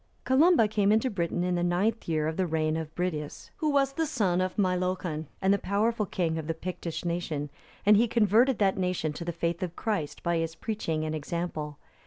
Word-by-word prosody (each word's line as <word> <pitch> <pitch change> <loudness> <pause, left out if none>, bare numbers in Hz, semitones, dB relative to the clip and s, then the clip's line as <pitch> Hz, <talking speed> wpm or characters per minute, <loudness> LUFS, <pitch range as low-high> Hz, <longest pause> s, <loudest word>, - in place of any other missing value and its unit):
Columba 275 -2 +5
came 205 -1 +2
into 220 +4 +2
Britain 175 -2 -1
in 180 0 0
the 175 0 0
ninth 195 +6 0
year 155 -1 +1
of 160 - -2
the 185 0 0
reign 155 -1 0
of 160 -1 -5
Bridius, 155 -5 -4
who 310 - 0
was 275 -1 +2
the 320 +2 0
son 195 - +1
of 185 0 -1
Meilochon,(304) 180 -4 0 0.2
and 190 +1 +5
the 200 - +1
powerful 210 +2 0
king 165 -2 -1
of 155 - -6
the 165 - -1
Pictish 175 0 -5
nation, 165 -4 -2 0.3
and 210 +1 +7
he 230 +3 +4
converted 230 +3 +3
that 195 -2 +2
nation 180 -4 -1
to 170 - -6
the 170 - -2
faith 170 +1 -2
of 175 -2 -3
Christ, 200 -10 -3
by 170 0 +1
his 165 0 -2
preaching 165 -6 -2
and 155 - -2
example. 155 -1 -4
180 Hz, 210 wpm, -28 LUFS, 160-210 Hz, 0.3 s, and